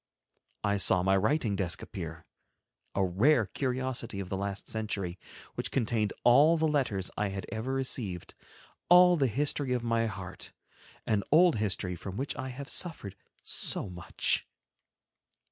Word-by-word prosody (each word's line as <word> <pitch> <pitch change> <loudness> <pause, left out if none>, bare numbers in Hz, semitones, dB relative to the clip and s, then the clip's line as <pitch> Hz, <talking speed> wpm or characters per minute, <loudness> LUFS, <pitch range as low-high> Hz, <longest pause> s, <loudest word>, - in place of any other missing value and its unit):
I 100 0 +1
saw 95 -2 +4
my 95 +1 +3
writing 110 +2 +1
desk 90 -3 -1
appear, 80 -5 -7 0.7
a 95 - +2
rare 110 +7 +3
curiosity 125 -1 -2
of 95 -2 -5
the 95 - -2
last 100 0 -4
century, 100 -5 -3 0.3
which - - -3
contained 110 -4 0
all 145 +7 +6
the 160 0 +2
letters 120 -11 -1
I 105 - +1
had 95 0 -5
ever 110 +4 -3
received, 125 -9 -3 0.6
all 180 0 +8
the 140 -5 +2
history 135 +2 0
of 125 -1 -1
my 115 -1 +1
heart, 95 -3 -7 0.5
an 105 -2 +1
old 170 0 +6
history 95 -3 -1
from 95 +3 -7
which 135 +3 -3
I 130 0 -5
have 135 +2 -7
suffered 155 - -2 0.3
so 95 - -1
much! 90 -2 -1
110 Hz, 145 wpm, -30 LUFS, 95-135 Hz, 0.7 s, all